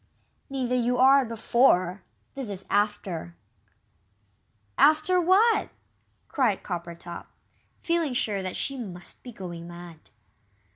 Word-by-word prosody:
"Neither 260 -2 -2
you 250 0 +1
are, 270 +2 +6
before 215 -5 +2 0.3
this 270 -5 -5
is 195 -1 -4
'after'." 200 -5 -1 1.4
"After 310 +4 +4
what?" 395 +7 +4 0.6
cried 240 -8 0
Coppertop, 170 -1 -7 0.6
feeling 335 -5 0
sure 210 -5 0
that 185 -1 -4
she 275 -1 -2
must 180 -7 -8
be 245 - -9
going 175 -5 -8
mad. 175 -2 -12
220 Hz, 105 wpm, -26 LUFS, 180-270 Hz, 1.4 s, are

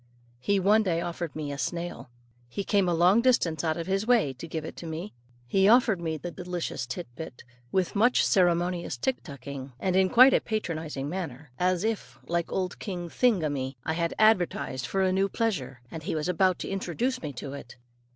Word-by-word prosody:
He 200 +10 +1
one 205 +4 +4
day 175 -5 0
offered 170 -2 -4
me 150 -2 -4
a 140 - -5
snail. 170 -6 -4 0.4
He 200 - -3
came 195 -3 +2
a - - +2
long 180 +7 +5
distance 205 -11 +2
out 160 -1 0
of 170 - -3
his 195 +3 -1
way 230 - +3
too 125 - -29
to 165 - -6
give 160 -1 -4
it - - -7
to 170 - -7
me. 165 +6 -5 0.3
He 190 +10 +3
offered 225 -6 +5
me 160 -2 -2
the 175 +3 -6
delicious 175 -8 -4
tit 170 +8 -5
bit 145 -5 -8 0.3
with 190 0 0
much 235 +5 +4
ceremonious 175 -5 +2
tick 255 - -1
tucking, 140 -2 -8
and 185 -1 0
in 190 0 +4
quite 255 +5 +8
a - - +4
patronizing 160 - -3
manner, 150 -5 -5
as 180 0 +2
if, 220 -1 -3
like 170 0 -1
old 185 -1 -2
King 175 -4 -5
Thingummy, 155 - +1
I 160 - 0
had 170 0 -1
advertised 175 - +2
for 195 0 0
a 185 - +2
new 195 +1 +2
pleasure, 140 - -2
and 160 - -6
he 160 - -3
was 155 +1 -1
about 185 +1 +2
to - - -4
introduce 195 +7 -2
me 150 - -4
to 135 +2 -6
it. 140 -4 -9
175 Hz, 205 wpm, -28 LUFS, 155-195 Hz, 0.4 s, quite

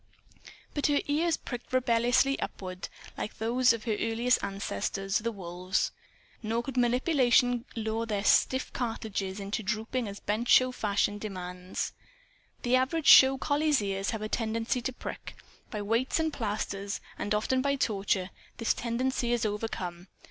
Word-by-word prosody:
But 290 - +1
her 290 -1 +3
ears 315 +3 +1
pricked 245 -2 -7
rebelliously 245 +2 +3
upward, 185 -1 -5 0.3
like - - -5
those 245 +3 +3
of 230 -2 -2
her 230 - -1
earliest 230 +3 +1
ancestors, 195 - -2
the 230 +2 -2
wolves. 180 -2 -2 0.5
Nor 230 +1 -1
could 270 0 -6
manipulation 245 -1 +3
lure 225 0 -2
their 205 -2 -1
stiff 260 +4 +3
cartilages 210 -5 -3
into 200 +2 -3
drooping 220 +4 -2
as 200 0 -7
bench 220 +4 -2
show 255 0 +6
fashion 205 -3 0
demands. 180 -3 -5 0.7
The 245 +1 +3
average 280 +5 0
show 265 0 +9
collie's 295 +1 +2
ears 195 -1 -2
have 220 -2 -3
a - - -1
tendency 225 +2 -1
to 250 - -2
prick. 250 - -7 0.3
By 210 -3 -4
weights 230 +8 +1
and 320 -1 0
plasters, 205 -4 -3 0.2
and 205 - 0
often 255 +5 +1
by 280 +1 +1
torture, 195 -6 0 0.3
this 230 - +1
tendency 240 +1 -1
is 240 -2 +1
overcome. 190 -4 -4
230 Hz, 150 wpm, -29 LUFS, 205-255 Hz, 0.7 s, show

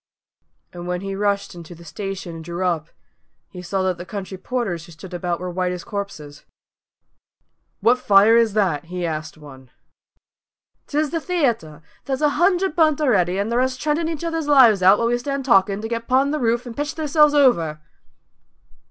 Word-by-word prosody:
And 175 0 -8
when 180 0 -2
he 195 0 -5
rushed 200 0 -1
into 170 0 -11
the 170 +1 -15
station 195 -3 -6
and 160 - -9
drew 175 +3 -4
up, 165 -4 -1 0.6
he 180 - -9
saw 190 +2 -2
that 185 -2 -1
the - - -5
country 195 -2 -6
porters 190 -5 -4
who - - -14
stood 180 +3 -12
about 175 0 -2
were 180 0 -5
white 180 0 -1
as 180 -1 -6
corpses. 155 -8 -7 1.4
"What 245 +2 +3
fire 205 0 +5
is 230 -3 +3
that?" 185 -9 0
he 180 +1 -4
asked 155 -1 -5
one. 135 -4 -14 1.2
"'Tis 300 0 -1
the 335 - -1
theayter! 235 - -2 0.2
There's 270 +1 -2
a 300 - +5
hundred 355 +3 +1
burnt 310 -3 +3
a'ready, 190 - +2
and 205 +3 -2
the 235 - +1
rest 255 +1 0
treadin' 310 +3 -1
each 325 -1 -5
other's 325 -2 -2
lives 250 -9 +6
out 190 +3 +6
while 230 - 0
we 240 +1 +1
stand 275 +1 -4
talkin', 195 -4 +3
to - - -2
get 230 0 -4
'pon 270 +2 +2
the 305 - -1
roof 235 0 0
and 240 -2 -8
pitch 290 +1 -3
theirselves 300 -1 +3
over!" 170 - +3
205 Hz, 185 wpm, -21 LUFS, 175-270 Hz, 1.4 s, lives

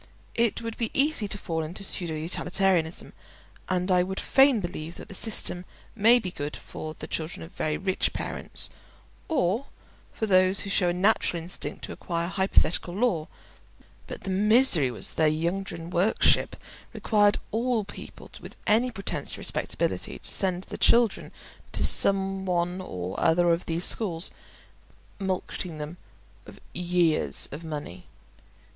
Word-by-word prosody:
It 235 0 0
would 230 -1 -5
be 230 -2 -1
easy 275 -6 +1
to 200 - -4
fall 165 -4 -3
into 170 +6 -5
pseudo 175 -4 0
utilitarianism, 175 +1 0 0.6
and 185 0 0
I 180 -1 +5
would 190 +2 -3
fain 270 -3 +4
believe 175 -3 -6
that - - -11
the - - -8
system 190 -3 0 0.3
may 230 +3 +5
be 190 -7 -4
good 145 -2 -5
for 155 0 -8
the - - -7
children 160 +1 -4
of 165 - -11
very 155 0 -2
rich 190 0 -1
parents, - - 0 0.6
or 240 - 0 0.4
for 220 - -3
those 185 -1 +4
who 195 - -4
show 180 -3 +3
a - - 0
natural 180 -3 +1
instinct 175 - -4
to - - -5
acquire 170 -1 -3
hypothetical 190 -2 +1
lore; 195 -8 0 0.8
but - - -8
the 195 - -4
misery 210 - +6
was 120 - -2
that - - -3
their 160 +2 +2
Ydgrun 175 -3 -6
worship 185 +6 +2 0.4
required 205 -2 +2
all 230 0 0
people - - -11
with - - -10
any 230 +4 +3
pretence 195 -5 -4
to - - -6
respectability - - -2
to - - -1
send 185 -2 0
their - - -8
children 235 -3 +3 0.4
to - - +1
some 195 -1 +3
one 180 +1 -1
or 90 - -5
other 170 +1 +3
of 170 - -3
these 165 +2 -1
schools, 180 -5 0 0.9
mulcting 185 -3 -4
them 150 +3 -7 0.5
of - - -13
years 170 - +2
of 150 +4 -7
money. 145 - -7
185 Hz, 150 wpm, -26 LUFS, 165-205 Hz, 0.9 s, misery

